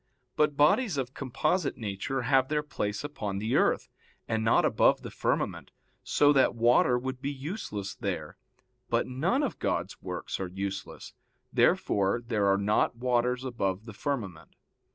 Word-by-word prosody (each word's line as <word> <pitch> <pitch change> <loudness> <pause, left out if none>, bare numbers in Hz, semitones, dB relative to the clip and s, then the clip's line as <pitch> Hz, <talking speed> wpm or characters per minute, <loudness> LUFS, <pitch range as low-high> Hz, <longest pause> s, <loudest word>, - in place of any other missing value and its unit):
But 150 -1 +2
bodies 165 - +3
of 130 -1 -3
composite 155 +6 -1
nature 115 +5 -3
have 130 +1 +3
their 150 +1 0
place 105 -8 -3
upon 105 -9 -4
the 110 +4 -1
earth, - - +2 0.4
and 110 -1 0
not 115 - +4
above - - +3
the - - -7
firmament, - - -1 0.3
so 145 0 +4
that 135 -3 +3
water 120 +1 +4
would 130 +1 -5
be 140 - -2
useless 135 - -5
there. - - -4 0.5
But - - +1
none 170 - 0
of 275 - -3
God's - - -2
works - - -5
are 95 - -2
useless. 95 +1 -6 0.4
Therefore 100 +3 +2
there 105 -4 +1
are 100 0 +4
not 105 +4 +1
waters 125 +1 0
above 105 -5 -2
the 110 - -9
firmament. 105 - -4
125 Hz, 155 wpm, -29 LUFS, 105-140 Hz, 0.5 s, not